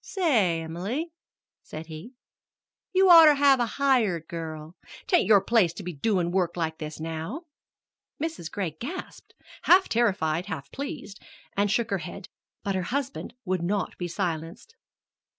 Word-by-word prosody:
"Say, 220 - +1
Emily," 200 - -4 0.5
said 155 +1 -8
he, 160 +11 -10 0.8
"you'd 380 0 +4
oughter 325 -4 +9
have 275 -2 +5
a 240 - +1
hired 225 - +2
girl. 160 -1 -7 0.3
'T 370 - +2
ain't 270 - +3
your 205 -2 +6
place 210 -8 +3
to - - -8
be 180 0 -5
doin' 175 +2 0
work 180 -2 0
like 160 -1 -2
this 155 -1 -6
now." 165 - -5 0.8
Mrs. 315 - -4
Gray 190 -5 -3
gasped 260 - -8 0.3
half 375 +2 +6
terrified, 185 -7 +1
half - - -6
pleased 280 -7 -7 0.3
and 205 +1 +2
shook 230 +1 0
her 195 - +1
head; 175 +4 -8 0.3
but 200 - -1
her 190 - -1
husband 275 -2 -3
was 185 -2 -1
not 190 +2 -1
to - - -21
be 175 - -3
silenced. 170 - -4
195 Hz, 155 wpm, -26 LUFS, 165-270 Hz, 0.8 s, oughter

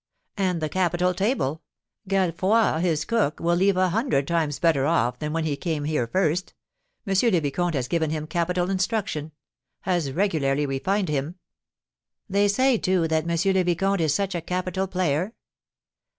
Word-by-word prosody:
"And 185 -5 -1
the - - +1
capital 180 0 +1
table! 180 - -1 0.5
Gallefroi, 190 0 +2
his 160 -4 0
cook, 220 -10 0
will 170 +1 +1
leave 190 +1 +2
a 185 0 +3
hundred 200 - 0
times 160 -4 0
better 155 -5 +2
off 125 -7 +1
than 150 -1 -3
when 165 +1 -1
he 150 -2 0
came 155 -1 -3
here 150 -5 -1
first. 180 +4 0 0.5
M. 195 - -1 0.2
le 180 - +3
Vicomte 165 +3 -1
has 130 -3 -1
given 160 0 0
him 155 0 -3
capital 175 +2 -1
instruction, 185 -6 -1 0.5
has 175 -7 -1
regularly 150 -5 +1
refined 185 +8 -1
him!" 150 +3 -2 0.9
"They 200 +1 +2
say, 255 +3 +2
too, 185 -3 +1
that 160 +1 0
M. 170 +3 +1
le 185 - +3
Vicomte 185 +2 +1
is 155 -2 +2
such 195 +4 0
a 175 - -2
capital 185 +2 -2
player?" 180 +2 -1
175 Hz, 165 wpm, -24 LUFS, 155-190 Hz, 0.9 s, a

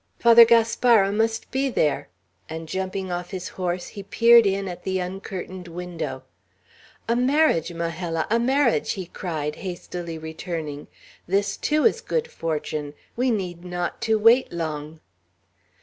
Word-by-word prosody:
"Father 235 0 +8
Gaspara 230 -2 +4
must 225 +2 -1
be 270 +1 0
there;" 150 - 0 0.4
and 160 0 -6
jumping 190 +1 -3
off 175 0 -4
his 185 -2 -5
horse, 180 -1 -3
he 200 - -8
peered 230 +3 +5
in 195 0 -1
at 175 -1 -6
the 190 0 -2
uncurtained 185 0 -6
window. 175 0 -5 0.8
"A 230 - +2
marriage, 250 - +2
Majella, 165 0 -2
a 230 - +4
marriage!" 260 +1 +2
he 190 -2 -5
cried, 155 -4 -4
hastily 175 -2 -6
returning. 160 -2 -6 0.4
"This, 195 +2 +1
too, 305 0 +1
is 460 +1 +3
good 475 0 -1
fortune. 150 -2 -3 0.2
We 255 +2 +1
need 180 -6 -2
not 175 -1 -4
to 220 - +4
wait 230 +4 +5
long." 155 -2 -5
185 Hz, 140 wpm, -24 LUFS, 170-230 Hz, 0.8 s, Father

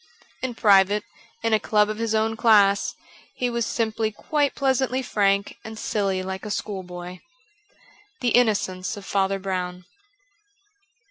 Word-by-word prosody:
In 255 -2 -3
private, 205 -1 +4 0.4
in 230 -1 +1
a 215 - +4
club 210 0 +2
of 215 +1 -4
his 225 -1 0
own 220 +1 +1
class, 205 -3 +4 0.4
he 245 -1 -1
was 235 -2 -1
simply 220 -1 -1
quite 290 +6 -1
pleasantly 265 -1 +1
frank 200 -3 +1
and 220 0 -8
silly 195 -3 -1
hke 190 0 -5
a 215 - -5
schoolboy. 180 -3 -5 0.5
* 415 -3 -30
The 245 - +2
Innocence 205 -5 +1
of 200 - -9
Father 195 0 0
Brozvn.' 180 -2 -4
210 Hz, 140 wpm, -24 LUFS, 195-230 Hz, 0.5 s, private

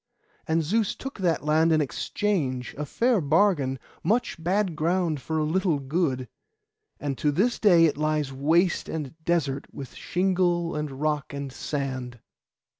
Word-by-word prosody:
And 160 +1 +2
Zeus 210 +6 0
took 270 -4 -8
that 170 -5 0
land 160 +2 +3
in 155 - +4
exchange, 140 - -1
a 150 +1 -4
fair 235 - +2
bargain, 150 -3 +2 0.3
much 205 -3 0
bad 185 0 +1
ground 165 -1 0
for 160 +5 -3
a 155 - +1
little 170 +1 +1
good, 135 -2 -1 0.7
and 140 -2 -2
to 150 - +2
this 215 +11 +1
day 175 -6 +6
it 150 - +1
lies 150 -2 0
waste 165 +7 +2
and 150 -5 -4
desert 145 -5 0
with 135 -2 -8
shingle, 175 -2 0
and 150 0 -2
rock, 145 +1 -2
and 140 -2 -5
sand. 130 -5 -4
155 Hz, 150 wpm, -26 LUFS, 140-180 Hz, 0.7 s, day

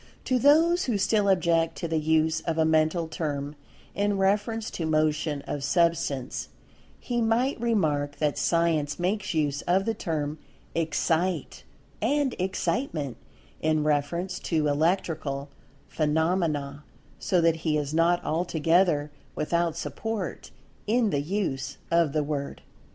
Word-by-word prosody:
To 255 -1 +2
those 325 +6 +4
who 235 -5 0
still 205 0 +2
object 165 -3 +2
to 170 - -3
the 160 -1 0
use 160 +1 +2
of 165 -1 -2
a 160 - +3
mental 160 +1 +2
term 145 -2 -3 0.4
in 205 0 0
reference 210 +3 0
to 165 - -3
motion 155 -1 0
of 145 - -4
Substance, 165 -5 0 0.5
he 240 -1 -2
might 230 +3 +1
remark 155 -11 +1
that 150 -1 0
Science 165 -4 +1
makes 190 +1 -1
use 145 -2 0
of 190 +2 +3
the 225 - 0
term—"Excite," 160 +1 -2 0.4
and 290 -3 +1
"Excitement"—in 155 - -2
reference 155 +5 -1
to 155 -3 0
Electrical 150 -2 0 0.4
phenomena, 155 -2 0 0.4
so 180 - +1
that 165 -1 +3
he 155 -1 0
is 145 0 -3
not 170 +2 +2
altogether 165 -1 +2 0.2
without 170 +1 0
support 220 +2 -4 0.4
in 225 0 +2
the 145 -2 +1
use 150 -5 -2
of 170 -3 +3
the 155 -1 +1
word. 145 -1 -4
165 Hz, 125 wpm, -27 LUFS, 150-190 Hz, 0.5 s, those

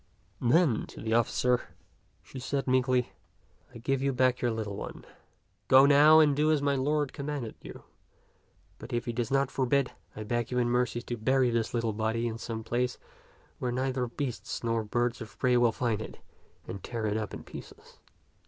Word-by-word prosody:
Then 130 -1 +3
to - - -12
the 110 0 -2
officer 120 +2 +2 0.6
she 130 - -9
said 135 +2 -2
meekly, 130 -1 +2 0.3
" - - -29
I - - -6
give 135 +3 -1
you 140 0 +1
back 130 0 +2
your 120 - +2
little 110 -3 -3
one. - - -7 0.6
Go 130 +1 +8
now 150 +2 +7
and 150 -3 +5
do 150 +2 +3
as 155 - +3
my 140 0 +1
lord 145 +1 0
commanded 140 -5 -4
you; - - -10 1.0
but 125 - -9
if 120 - -1
he 120 - -3
does 120 0 -2
not 135 -1 +1
forbid, 135 0 +1 0.2
I 110 - -5
beg 120 +2 -2
you 125 - -2
in 120 -1 +2
mercy 120 -1 0
to 120 - -4
bury 130 +2 +2
this 115 0 -1
little 115 -2 0
body 110 +2 -1
in 115 0 -5
some 115 -1 -5
place 125 +2 -1 0.6
where 125 - -1
neither 130 0 -1
beasts 125 0 -5
nor 115 -1 0
birds 120 +3 -1
of 110 - -9
prey 125 -1 +2
will 120 -1 +4
find 110 -2 -1
it - - -8 0.5
and 100 - -7
tear 115 -2 -4
it 105 0 0 0.2
in - - -9
pieces." - - -12
125 Hz, 190 wpm, -29 LUFS, 115-135 Hz, 1.0 s, Go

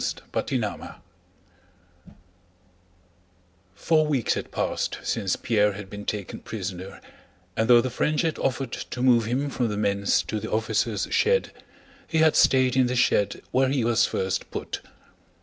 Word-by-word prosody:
CHAPTER - - -1
XII 90 0 -11 1.6
Four 155 +8 +2
weeks 135 -6 +1
had - - -5
passed - - -2
since 95 -2 -1
Pierre 105 -3 +1
had 100 -1 -9
been 105 0 -7
taken 105 -3 -4
prisoner 95 -2 -6 0.6
and 110 +1 0
though 120 -1 +8
the 130 +1 -3
French 150 +6 0
had 160 -2 -1
offered 135 -1 -1
to 125 - -6
move 120 -3 +4
him 135 +5 -1
from 125 -3 0
the 105 -2 -3
men's 100 -1 +1
to 110 - -3
the 110 - -6
officers' 110 -1 0
shed, 480 +2 +2 0.6
he 160 - -1
had 160 -1 +4
stayed 130 -1 +4
in 130 -1 +4
the 125 - -2
shed 105 -4 +1
where 130 +1 +3
he 135 -3 0
was 120 0 +3
first 95 0 -2
put. - - -5
115 Hz, 150 wpm, -25 LUFS, 100-130 Hz, 1.6 s, though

